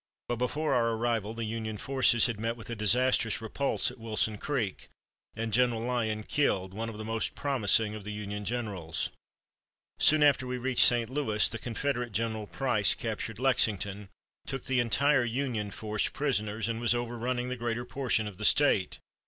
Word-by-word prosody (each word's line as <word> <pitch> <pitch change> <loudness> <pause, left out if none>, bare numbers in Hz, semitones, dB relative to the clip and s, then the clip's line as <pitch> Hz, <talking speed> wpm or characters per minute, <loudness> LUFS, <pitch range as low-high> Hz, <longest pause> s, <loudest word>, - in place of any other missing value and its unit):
But 120 - -2
before 150 +6 -1
our 115 -2 +2
arrival 115 -2 -1
the 115 -1 -3
Union 110 -1 -4
forces 130 0 +4
had 115 -4 -2
met 115 +2 -2
with 115 0 -8
a - - -3
disastrous 115 +1 +3
repulse 125 +4 -1
at 125 - -15
Wilson 110 -1 -1
Creek, 120 -10 -3 0.5
and 110 0 -3
General 120 -1 +3
Lyon 115 -3 -1
killed, 95 -9 0
one 115 +3 -4
of 110 - -8
the 110 - -6
most 115 0 -2
promising 110 -6 +1
of 110 -1 -7
the 105 - -6
Union 105 0 -5
generals. 100 -8 -3 0.9
Soon 155 -1 +5
after 140 -3 +3
we 125 0 -3
reached 130 0 +4
St. 120 -1 +2
Louis, 120 -7 +2
the 110 - -4
Confederate 125 -1 -3
General 110 -1 -2
Price 110 +1 +1
captured 110 -1 -4
Lexington, 105 -6 +1 0.4
took 135 - -4
the 130 -2 0
entire 135 +3 +3
Union 120 -3 -2
force 105 0 -2
prisoners, 110 -7 -1
and 115 0 -3
was 120 0 +3
overrunning 120 +1 -2
the 125 - -2
greater 120 0 -3
portion 125 -4 -1
of 105 -3 -7
the - - -6
State. - - +4
115 Hz, 175 wpm, -29 LUFS, 110-125 Hz, 0.9 s, Soon